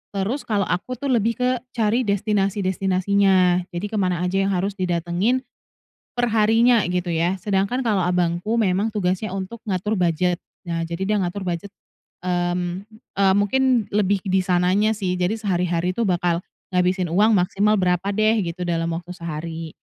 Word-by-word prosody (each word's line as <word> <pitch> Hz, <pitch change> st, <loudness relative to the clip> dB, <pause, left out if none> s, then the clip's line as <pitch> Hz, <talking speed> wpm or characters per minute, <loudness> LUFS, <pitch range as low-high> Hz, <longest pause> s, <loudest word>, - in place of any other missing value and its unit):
Terus 215 Hz, +9 st, -1 dB
kalau 205 Hz, -4 st, 0 dB
aku 245 Hz, +8 st, -3 dB
tuh 275 Hz, +2 st, -2 dB
lebih 230 Hz, 0 st, +1 dB
ke 250 Hz, -1 st, 0 dB
cari 225 Hz, +1 st, +2 dB
destinasi-destinasinya 195 Hz, -3 st, +2 dB
jadi 175 Hz, +2 st, -4 dB
ke 215 Hz, +1 st, -4 dB
mana 180 Hz, -1 st, 0 dB
aja 190 Hz, +2 st, +1 dB
yang 195 Hz, -, +1 dB
harus 195 Hz, +1 st, -1 dB
didatengin 185 Hz, +7 st, 0 dB, 0.7 s
per 245 Hz, -1 st, 0 dB
harinya 225 Hz, +1 st, +4 dB
gitu 180 Hz, 0 st, -1 dB
ya, 175 Hz, +3 st, 0 dB
sedangkan 200 Hz, +5 st, 0 dB
kalau 210 Hz, -7 st, +1 dB
abangku 180 Hz, +5 st, 0 dB
memang 200 Hz, +2 st, +1 dB
tugasnya 190 Hz, 0 st, -1 dB
untuk 195 Hz, +4 st, -6 dB
ngatur 210 Hz, +1 st, -1 dB
budget. 175 Hz, 0 st, +1 dB, 0.3 s
Nah, 165 Hz, 0 st, -1 dB
jadi 170 Hz, +4 st, -4 dB
dia 215 Hz, -, +2 dB
ngatur 190 Hz, 0 st, -2 dB
budget, 180 Hz, +2 st, -4 dB, 0.5 s
mmm, 175 Hz, +1 st, -2 dB, 0.3 s
eee, 195 Hz, -1 st, +5 dB
mungkin 245 Hz, +4 st, +2 dB
lebih 200 Hz, -2 st, +1 dB
di 190 Hz, -1 st, +1 dB
sananya 185 Hz, +4 st, +2 dB
sih, 185 Hz, -3 st, -2 dB
jadi 180 Hz, +4 st, +1 dB
sehari 185 Hz, -5 st, -1 dB
hari 175 Hz, +1 st, 0 dB
tuh 225 Hz, +3 st, -1 dB
bakal 175 Hz, -2 st, +1 dB, 0.3 s
ngabisin 180 Hz, -1 st, +1 dB
uang 210 Hz, +5 st, +4 dB
maksimal 200 Hz, +3 st, +2 dB
berapa 180 Hz, -1 st, +1 dB
deh 215 Hz, +1 st, +3 dB
gitu 180 Hz, -1 st, -3 dB
dalam 165 Hz, -1 st, -1 dB
waktu 175 Hz, +1 st, -7 dB
sehari. 165 Hz, -1 st, -6 dB
190 Hz, 160 wpm, -22 LUFS, 180-210 Hz, 0.7 s, eee